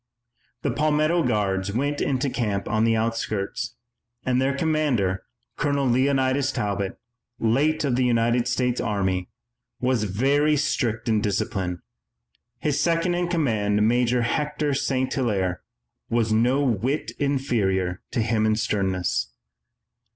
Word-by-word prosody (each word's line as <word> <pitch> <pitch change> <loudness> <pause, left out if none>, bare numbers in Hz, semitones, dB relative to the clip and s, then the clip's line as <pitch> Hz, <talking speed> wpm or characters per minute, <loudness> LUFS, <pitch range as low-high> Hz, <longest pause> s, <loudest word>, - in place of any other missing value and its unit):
The - - +1
Palmetto 155 +3 +2
Guards 100 -5 0
went 145 +5 -1
into 135 0 0
camp 105 -6 -2
on 110 0 +2
the 115 0 +3
outskirts, 110 0 -2 0.5
and 125 0 +2
their 140 +1 0
commander, 140 - +1 0.4
Colonel 140 -2 +1
Leonidas 130 +2 +2
Talbot, 100 -5 -2 0.4
late 140 +9 +1
of 135 -4 +1
the 130 - +2
United 120 0 +2
States 125 0 0
Army, 95 -4 -1 0.5
was 125 -4 +1
very 140 +9 +2
strict 120 -6 -1
in 110 -2 +2
discipline. 95 -3 -2 0.7
His 150 +3 0
second 170 +2 +1
in 175 0 0
command, 110 - +1
Major 120 +1 +2
Hector 150 +3 -1
St. 130 -1 0
Hilaire, 95 - 0 0.5
was 115 -2 +1
no 125 +6 +3
whit 130 +4 0
inferior 105 - 0
to 115 - 0
him 110 -1 +1
in 110 - +3
sternness. 95 -4 -1
120 Hz, 125 wpm, -24 LUFS, 105-140 Hz, 0.7 s, the